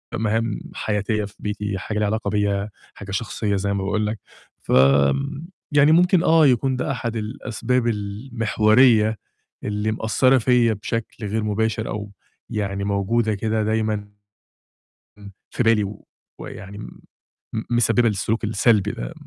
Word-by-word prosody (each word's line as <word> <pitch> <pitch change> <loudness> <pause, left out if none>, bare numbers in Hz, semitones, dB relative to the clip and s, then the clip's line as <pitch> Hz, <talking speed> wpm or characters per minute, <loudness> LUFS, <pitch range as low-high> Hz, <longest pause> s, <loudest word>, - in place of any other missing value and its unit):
مهام 110 0 -1 0.2
حياتية 105 0 -1
في 100 - -12
بيتي، 105 -1 -3
حاجة 105 +3 -4
ليها 105 - +1
علاقة 110 -1 -1
بيَّ، 100 -1 0 0.3
حاجة 100 -1 -9
شخصية 105 0 -2
زي 100 +1 -1
ما 100 - -2
باقول 105 +2 0
لك. 110 0 -4 0.4
فآمم 70 - +2 0.2
يعني 145 +1 +5
ممكن 175 +1 +4
آه 160 -2 +5
يكون 130 +1 +2
ده 125 - -2
أحد 120 -3 -3
الأسباب 115 +2 -2
المحورية 110 +1 +2 0.5
اللي 105 +1 -1
مأثرة 120 +5 +3
فيَّ 120 -1 +3
بشكل 110 +1 -5
غير 110 +2 -1
مباشر 110 +1 -1
أو 105 -1 -5 0.4
يعني 100 -2 -2
موجودة 105 +2 0
كده 110 +1 -1
دايمًا 110 -1 -1 1.4
في 120 - -1
بالي 115 -2 +3
و 100 +1 -10 0.3
ويعني 100 +1 -9
م 105 - -10 0.7
مسببة 120 0 +3
للسلوك 110 +3 -2
السلبي 105 -1 +2
ده، - - -6
110 Hz, 135 wpm, -22 LUFS, 105-115 Hz, 1.4 s, يعني